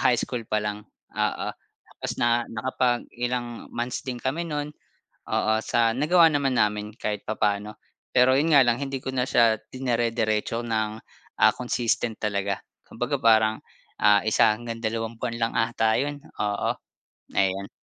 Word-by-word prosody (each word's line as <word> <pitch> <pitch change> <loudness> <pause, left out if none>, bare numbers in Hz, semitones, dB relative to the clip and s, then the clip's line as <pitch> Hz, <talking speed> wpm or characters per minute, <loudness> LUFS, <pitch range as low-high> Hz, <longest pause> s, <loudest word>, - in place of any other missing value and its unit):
high 125 -1 +4
school 125 - -3
pa 105 0 0
lang, 105 0 -4 0.3
oo. - - -1 0.5
Tapos - - -2
na 120 0 +3
nakapag 120 +1 0
ilang 120 -1 -3
months 120 +2 -3
din 125 -2 -5
kami 155 +6 -1
no'n, 150 -2 -3 0.6
oo, 110 - +2
sa 115 -1 +2
nagawa 165 +5 +5
naman 140 -5 +1
namin 105 0 0
kahit 105 0 -3
papaano. 105 0 -1 0.4
Pero 125 +1 +6
'yon 155 0 +3
nga 140 - +8
lang 120 +1 +1
hindi 135 -2 -4
ko 130 - -3
na 125 -1 0
siya 115 -4 +4
dinerediretso 115 -3 -1
ng, 110 -2 -1 0.5
ah, - - +8
consistent 120 -2 -1
talaga. 100 -1 -1 0.2
Kumbaga 125 +4 -2
parang, 110 -2 +4 0.4
ah, 105 -1 +5
isa 110 0 +4
hanggang 115 0 -6
dalawang 115 0 -3
buwan 115 - -3
lang 115 0 0
ata 110 -1 +2
'yon, 145 +1 -3 0.2
oo 105 -1 0 0.6
ayon. 95 0 +1
115 Hz, 150 wpm, -25 LUFS, 110-125 Hz, 0.6 s, nga